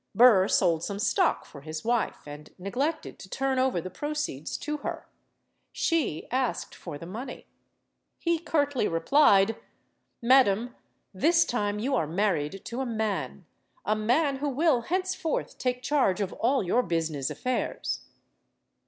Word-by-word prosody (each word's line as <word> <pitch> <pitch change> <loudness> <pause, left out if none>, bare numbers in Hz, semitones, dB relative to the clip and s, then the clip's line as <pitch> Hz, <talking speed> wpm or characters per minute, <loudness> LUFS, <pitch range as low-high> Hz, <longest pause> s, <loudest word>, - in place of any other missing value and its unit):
Burr 220 -6 +7
sold 170 -5 +2
some 200 +1 -3
stock 205 - +1
for 140 - -12
his 155 +3 -6
wife, 235 -1 0
and 150 +1 -10
neglected 260 - -3
to 190 - -11
turn 265 +2 0
over 260 -8 +2
the 185 +2 -6
proceeds 295 - -3
to 300 0 -3
her. 285 - -6 0.6
She 300 - 0
asked 255 -1 -1
for 145 - -8
the 165 - -9
money. 235 +8 -7 0.7
He 335 -1 0
curtly 285 -7 0
replied: 200 - +4 0.6
"Madam, 240 -2 +4 0.4
this 335 - +4
time 205 -4 -1
you 255 +6 -1
are 165 - +1
married 180 -1 -1
to 240 +3 -4
a - - -1
man. 215 - -3 0.4
A 215 - +2
man 270 +7 +1
who 290 +2 -1
will 280 -2 +2
henceforth 370 +2 -2
take 250 0 -1
charge 260 -11 +2
of 195 -2 -2
all 260 +1 +1
your 210 +7 +2
busi 165 -6 -1
ness 140 -3 -2
affairs." 255 0 -2
235 Hz, 145 wpm, -27 LUFS, 185-275 Hz, 0.7 s, Burr